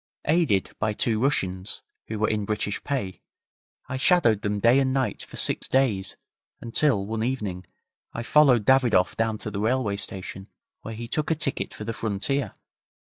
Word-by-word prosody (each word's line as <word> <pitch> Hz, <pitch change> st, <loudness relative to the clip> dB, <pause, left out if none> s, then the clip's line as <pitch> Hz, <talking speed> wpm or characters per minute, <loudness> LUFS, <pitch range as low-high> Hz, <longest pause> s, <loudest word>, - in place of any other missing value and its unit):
Aided 150 Hz, -, +2 dB
by 110 Hz, 0 st, 0 dB
two 110 Hz, +1 st, 0 dB
Russians, 95 Hz, -8 st, -1 dB, 0.2 s
who 110 Hz, -, -4 dB
were 110 Hz, -, +1 dB
in 105 Hz, -1 st, 0 dB
British 105 Hz, 0 st, -2 dB
pay, 125 Hz, -10 st, -3 dB, 0.7 s
I 130 Hz, -, -3 dB
shadowed 130 Hz, -, +3 dB
them 105 Hz, -1 st, -1 dB
day 120 Hz, +5 st, +5 dB
and 130 Hz, -1 st, +1 dB
night 130 Hz, -1 st, -1 dB
for -, -, -9 dB
six -, -, +1 dB
days, 120 Hz, -8 st, +1 dB, 0.4 s
until, 115 Hz, -3 st, +1 dB
one 110 Hz, +1 st, -3 dB
evening, 105 Hz, -8 st, -3 dB, 0.4 s
I 115 Hz, -, -5 dB
followed 125 Hz, -5 st, +5 dB
Davidoff 125 Hz, -8 st, +4 dB
down 110 Hz, -1 st, 0 dB
to 105 Hz, -, -6 dB
the 100 Hz, -, -4 dB
railway 110 Hz, -3 st, 0 dB
station, 95 Hz, 0 st, -5 dB, 0.3 s
where 115 Hz, -, -7 dB
he 115 Hz, +1 st, -6 dB
took 150 Hz, +5 st, -1 dB
a 160 Hz, -, +2 dB
ticket 150 Hz, -3 st, -2 dB
for -, -, -8 dB
the 115 Hz, +2 st, -3 dB
frontier. 115 Hz, +7 st, -2 dB
115 Hz, 170 wpm, -25 LUFS, 105-130 Hz, 0.7 s, day